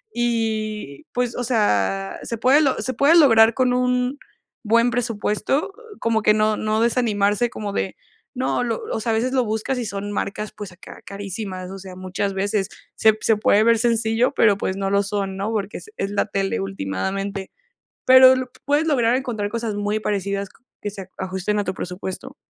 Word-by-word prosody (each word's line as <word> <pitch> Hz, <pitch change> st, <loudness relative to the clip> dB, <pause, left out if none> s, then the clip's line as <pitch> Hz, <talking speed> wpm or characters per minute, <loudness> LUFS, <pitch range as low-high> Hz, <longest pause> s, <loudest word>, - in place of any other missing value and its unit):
Y, 220 Hz, -9 st, -2 dB
pues, 245 Hz, -1 st, -1 dB
o 245 Hz, -, -2 dB
sea, 100 Hz, -, 0 dB
se 230 Hz, -, -4 dB
puede 260 Hz, +6 st, +4 dB
lo 275 Hz, -4 st, +1 dB
se 260 Hz, -, -2 dB
puede 285 Hz, +6 st, +4 dB
lograr 225 Hz, -7 st, +6 dB
con 255 Hz, -1 st, +2 dB
un 250 Hz, +2 st, 0 dB, 0.4 s
buen 235 Hz, +2 st, +3 dB
presupuesto, 235 Hz, -, -1 dB, 0.3 s
como 230 Hz, -1 st, +1 dB
que 210 Hz, -, +4 dB
no 215 Hz, 0 st, +2 dB
no 215 Hz, +1 st, 0 dB
desanimarse 225 Hz, -2 st, +1 dB
como 205 Hz, -3 st, -5 dB
de, 190 Hz, -, -2 dB, 0.4 s
no, 255 Hz, -1 st, 0 dB
lo 230 Hz, -2 st, -2 dB
o -, -, -1 dB
sea, 230 Hz, +1 st, -1 dB
a -, -, +2 dB
veces 250 Hz, +4 st, 0 dB
lo 260 Hz, -2 st, +3 dB
buscas 220 Hz, +4 st, -2 dB
y 240 Hz, -, -3 dB
son 205 Hz, -1 st, -4 dB
marcas, 210 Hz, +1 st, -3 dB
pues 205 Hz, -3 st, -8 dB
acá, 175 Hz, -, -13 dB
carísimas, 195 Hz, -2 st, -6 dB
o 195 Hz, -, -8 dB
sea, 185 Hz, -1 st, -10 dB
muchas 185 Hz, +2 st, -3 dB
veces 200 Hz, 0 st, -1 dB, 0.3 s
se 220 Hz, -1 st, +4 dB
se 220 Hz, -, +3 dB
puede 210 Hz, 0 st, +4 dB
ver 230 Hz, 0 st, +4 dB
sencillo, 230 Hz, +2 st, +1 dB
pero, 210 Hz, -3 st, +5 dB
pues 190 Hz, -1 st, -3 dB
no 195 Hz, 0 st, -2 dB
lo 200 Hz, 0 st, +3 dB
son, 195 Hz, -1 st, -3 dB
¿no? 200 Hz, +3 st, -3 dB
Porque 210 Hz, -2 st, -3 dB
se 430 Hz, -, -14 dB
es 195 Hz, -, -2 dB
la 205 Hz, -, +1 dB
tele 195 Hz, -, -1 dB
ultimadamente. 190 Hz, -, -3 dB, 0.5 s
Pero 260 Hz, 0 st, +8 dB
lo 255 Hz, -1 st, -3 dB, 0.2 s
puedes 290 Hz, +2 st, +2 dB
lograr 245 Hz, -6 st, +3 dB
encontrar 235 Hz, -6 st, -2 dB
cosas 230 Hz, -1 st, -3 dB
muy 205 Hz, +1 st, -1 dB
parecidas 200 Hz, -1 st, -2 dB
qu -, -, -26 dB, 0.2 s
que 205 Hz, -, -4 dB
se 195 Hz, -2 st, -9 dB
ajusten 190 Hz, +2 st, -2 dB
a -, -, 0 dB
tu 185 Hz, -1 st, -3 dB
presupuesto. 190 Hz, +9 st, -6 dB
215 Hz, 190 wpm, -22 LUFS, 195-240 Hz, 0.5 s, Pero